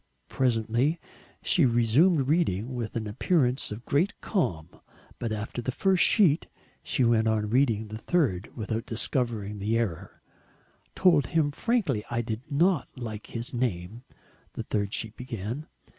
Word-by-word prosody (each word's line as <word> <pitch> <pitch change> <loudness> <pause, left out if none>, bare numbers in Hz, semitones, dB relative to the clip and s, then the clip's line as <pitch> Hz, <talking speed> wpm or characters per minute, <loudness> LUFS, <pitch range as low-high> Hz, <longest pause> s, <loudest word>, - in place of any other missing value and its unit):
Presently 125 +5 +1 0.4
she 175 - +3
resumed 130 +6 +4
reading 130 - +1
with 120 -3 -4
an 115 -2 -2
appearance 125 - +1
of 110 +3 -7
great 175 +10 +1
calm. 90 - -1 0.5
But 115 -2 -3
after 110 +3 -4
the 130 - -2
first 190 +6 +3
sheet 175 -9 +4 0.3
she 130 - 0
went 115 -1 +3
on 105 -1 0
reading 115 -4 +2
the 110 +1 -7
third 115 - 0
without 110 +1 -3
discovering 110 -3 -2
the 110 +3 0
error: 100 -9 -4 0.7
"told 160 -8 +4
him 155 -3 +1
frankly 170 - 0
I 120 0 0
did 110 -1 -4
not 165 +2 +2
like 110 -4 -6
his 115 +2 -5
name," 115 -3 -2 0.5
the - - -5
third 100 -2 -1
sheet 110 0 -3
began. 120 +4 -5
120 Hz, 145 wpm, -27 LUFS, 110-145 Hz, 0.7 s, resumed